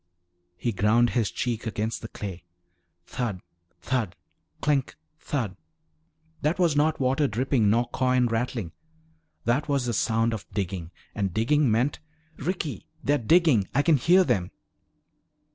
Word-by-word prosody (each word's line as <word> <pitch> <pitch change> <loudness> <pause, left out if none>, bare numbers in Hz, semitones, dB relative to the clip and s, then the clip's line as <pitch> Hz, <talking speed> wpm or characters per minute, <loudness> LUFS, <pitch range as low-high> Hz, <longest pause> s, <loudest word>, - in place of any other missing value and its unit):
He 120 +6 -1
ground 110 +4 +3
his 115 -4 +1
cheek 120 -2 -3
against 110 +1 -2
the 110 - -6
clay. 95 -5 -7 0.6
Thud, 115 -5 -3 0.4
thud, 120 -8 -1 0.4
clink, 140 -3 0 0.2
thud. 115 -10 -3 0.9
That 155 +4 +1
was 170 -5 +2
not 155 +2 +2
water 135 +2 +2
dripping 120 -1 +1
nor 120 +3 +2
coin 130 -1 +2
rattling. 115 -5 -2 0.7
That 135 +6 +1
was 140 -3 +1
the 120 - -1
sound 115 +1 +1
of 110 - -6
digging. 95 -4 -3 0.2
And 100 -4 -2
digging 140 +5 +3
meant 120 +6 +1 0.4
"Ricky! 165 -1 -3 0.2
They're 145 +1 +2
digging! 140 - +4
I 145 - +4
can 160 -2 +4
hear 180 +8 +5
them!" 100 - 0
120 Hz, 135 wpm, -26 LUFS, 110-145 Hz, 0.9 s, hear